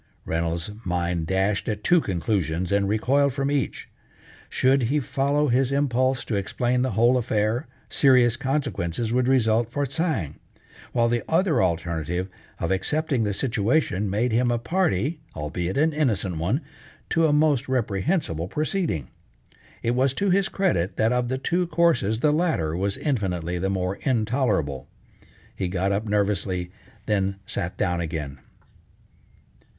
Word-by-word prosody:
Reynolds's 85 +3 -2
mind 85 -3 -1
dashed 95 +4 0
at 105 -1 -3
two 175 -1 +4
conclusions 90 - -1
and 100 0 +2
recoiled 135 +6 +2
from 140 +1 -1
each. 140 -2 -2 0.6
Should 130 -2 +2
be 150 +2 +2
follow 140 +2 0
his 130 +2 +2
impulse 130 -2 +1
to - - -4
explain 120 +5 0
the 130 -3 0
whole 120 +5 +4
affair, 110 +3 0 0.2
serious 125 -4 +4
consequences 120 - -2
would 125 0 +2
result 115 -3 +3
for 145 +4 -1
Tsang, 135 - -2 0.5
while 115 -1 +2
the 120 0 +1
other 160 -6 +3
alternative 85 0 -1 0.3
of 85 - -2
accepting 135 - 0
the 105 - 0
situation 105 -1 0
made 110 +5 0
him 120 +2 +2
a 120 - +1
party, 150 - 0 0.2
albeit 85 - -3
an 155 +2 +3
innocent 110 - 0
one, 95 - 0 0.5
to 165 0 +3
a - - +2
most 145 -3 +2
reprehensible 110 - 0
proceeding. 155 - -1 0.8
It 115 - +1
was 130 +1 +2
to 200 -1 +1
his 195 +2 +2
credit, 95 - 0
that 110 +2 +2
of 125 -1 0
the 130 +2 -1
two 175 +6 0
courses 155 - +2
the 150 - +4
latter 150 - 0
was 100 +3 -1
infinitely 90 - -1
the 95 +2 -1
more 95 0 -1
intolerable. 110 - 0 0.7
He 95 - -2
got 95 +2 0
up 100 +2 -1
nervously, 95 -3 0 0.3
then 100 -2 0
sat 90 -2 -4
down 90 -4 0
again. 75 -4 -4
115 Hz, 145 wpm, -24 LUFS, 95-135 Hz, 0.8 s, two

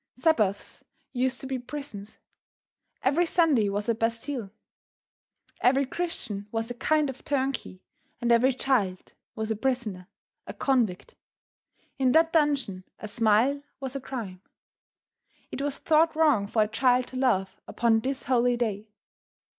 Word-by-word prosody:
Sabbaths 225 - 0 0.3
used 255 0 0
to - - -7
be 265 -1 -3
prisons. 245 -6 -8 0.9
Every 320 +6 +2
Sunday 300 - +3
was 205 +1 -2
a 230 - +3
Bastile. 230 +1 -2 1.1
Every 270 +2 +4
Christian 255 - -4
was 225 +1 -2
a - - -2
kind 305 +5 +1
of 265 -1 -7
turnkey, 265 -9 -2 0.4
and 240 -1 +1
every 240 +3 +5
child 235 -8 -1 0.2
was 220 0 -3
a - - +1
prisoner, 220 -7 -2 0.4
a - - -7
convict. 240 -9 0 0.9
In 255 -2 +3
that 325 0 +4
dungeon, 280 - +1
a 215 - -7
smile 230 +6 +2 0.2
was 270 -1 -5
a 275 - -3
crime. 220 -9 -6 1.1
It - - -4
was 285 -1 -2
thought 320 +1 +3
wrong 295 -11 +3
for 215 +1 +2
a - - -2
child 250 +3 +2
to 260 - -7
laugh 210 -8 0
upon 230 -1 +2
this 265 +4 -3
holy 245 -1 +2
day. 215 -3 -2
245 Hz, 140 wpm, -27 LUFS, 215-275 Hz, 1.1 s, every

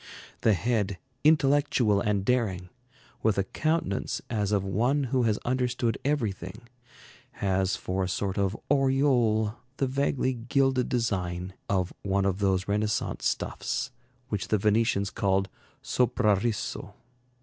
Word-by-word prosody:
The 110 - +4
head, 105 -1 0 0.3
intellectual 140 -8 +3
and 100 -2 0
daring, 100 -8 0 0.5
with 110 -3 +2
a 100 - +3
countenance 155 - -1
as 105 -3 0
of 100 -2 +2
one 120 +9 +1
who 130 - +3
has 105 - +1
understood 125 -2 0
everything, 110 - -2 0.7
has 95 -1 0
for 95 +1 -2
a 90 - -2
sort 100 +1 -2
of 100 +2 0
aureole 130 -6 +3 0.2
the 135 - +1
vaguely 130 0 0
gilded 130 +1 +1
design 95 -7 -1 0.2
of 95 -2 0
one 100 0 0
of 95 0 0
those 95 -2 +1
Renaissance 105 +1 0
stuffs - - -2 0.4
which - - -2
the 110 - +2
Venetians 105 -1 +2
call 95 -1 +1 0.4
soprarisso. 105 -3 0
105 Hz, 125 wpm, -27 LUFS, 95-125 Hz, 0.7 s, The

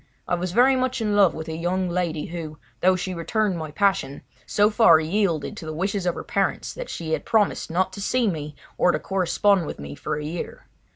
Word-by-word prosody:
I - - -2
was 175 0 -1
very 250 +6 +5
much 255 0 0
in 210 -2 0
love 200 -3 +5
with 160 0 -6
a 160 - -4
young 180 +3 -1
lady 170 -3 -1
who, 160 -3 -6 0.2
though 185 +5 +4
she 185 0 -3
returned 190 +2 -1
my 155 -1 -5
passion, 195 -4 0 0.2
so 210 +1 +3
far 210 -7 +6
yielded 165 -2 0
to 160 - -7
the 155 - -5
wishes 195 +2 -1
of 175 - +1
her - - -6
parents 200 -5 -1
that - - -7
she 160 -2 -5
had - - -1
promised 215 -3 +1
not 185 +3 0
to 200 - -7
see 245 +3 +1
me 150 -5 -3 0.2
or 180 - +5
to 155 - 0
correspond 190 0 +1
with - - -6
me 70 0 -8
for - - -4
a 150 0 -5
year. 165 +3 -6
180 Hz, 225 wpm, -24 LUFS, 160-205 Hz, 0.2 s, far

